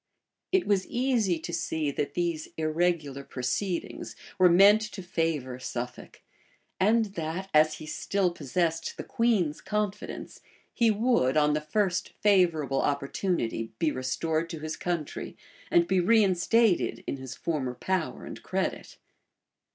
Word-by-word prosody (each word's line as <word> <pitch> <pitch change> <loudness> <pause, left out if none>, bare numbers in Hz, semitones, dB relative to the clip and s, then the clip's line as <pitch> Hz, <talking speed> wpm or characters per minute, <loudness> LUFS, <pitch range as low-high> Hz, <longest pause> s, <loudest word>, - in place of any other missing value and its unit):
It 380 -1 +3
was 195 -2 +1
easy 235 -8 +1
to 165 +2 -7
see, 160 -3 -1
that 140 0 -3
these 170 -3 -1
irregular 155 -3 0
proceedings 140 +9 -3 0.2
were 185 -1 +7
meant 200 +5 +7
to 190 - -7
favor 155 -8 -2
Suffolk, 125 -1 -6 0.6
and 215 +1 +3
that, 170 +3 -4
as 155 0 +5
he 155 - -9
still 185 +4 0
possessed 165 +2 -2
the - - -5
queen's 205 -10 +1
confidence, 210 -1 -4 0.3
he 235 -2 +3
would, 210 - +2
on 150 0 +4
the 150 - 0
first 185 +3 -1
favorable 170 -9 +3
opportunity, 140 - -1
be 155 +3 +1
restored 155 +6 -1
to 165 - -6
his 155 0 -4
country, 170 -4 -4 0.3
and 170 0 +4
be 190 -1 +2
reinstated 205 +1 +3
in - - -3
his 130 -1 -8
former 135 -7 -2
power 185 +4 -2
and - - -8
credit. - - -3
170 Hz, 135 wpm, -28 LUFS, 150-195 Hz, 0.6 s, were